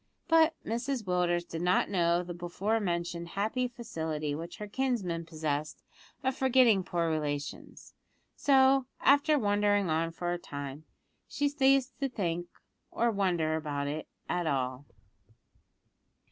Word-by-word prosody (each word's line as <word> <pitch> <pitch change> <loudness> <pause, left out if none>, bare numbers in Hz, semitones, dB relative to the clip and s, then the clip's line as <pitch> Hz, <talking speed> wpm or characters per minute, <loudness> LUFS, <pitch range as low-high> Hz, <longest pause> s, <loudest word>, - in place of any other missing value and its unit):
But 325 -1 +5
Mrs 240 +2 -2
Willders 175 -2 0
did 165 - -5
not 180 +1 +3
know 170 -3 +2
of 180 - -4
the 175 - -5
before 180 +6 -1
mentioned 170 -3 -2
happy 220 +5 0
facility 160 -11 -4
which 165 +3 -6
her 210 -1 -6
kinsman 200 -9 -1
possessed 155 -2 -3 0.4
of 265 0 0
forgetting 255 -7 +4
poor 170 -1 -1
relations; 145 -2 -4 0.4
so, 270 -1 +4
after 285 +2 +5
wondering 205 - +2
on 165 +1 +1
for 175 +1 -2
a 175 - -3
time, 145 -1 -7 0.4
she 290 - 0
ceased 275 -2 +2
to 275 - +1
wonder 255 - -14 0.8
or 235 +1 +1
to - - -6 0.4
think 160 - +1
about 145 -2 -3
it 150 +2 -4 0.2
at 175 -2 -1
all. 130 -1 -2
180 Hz, 140 wpm, -30 LUFS, 160-250 Hz, 0.8 s, But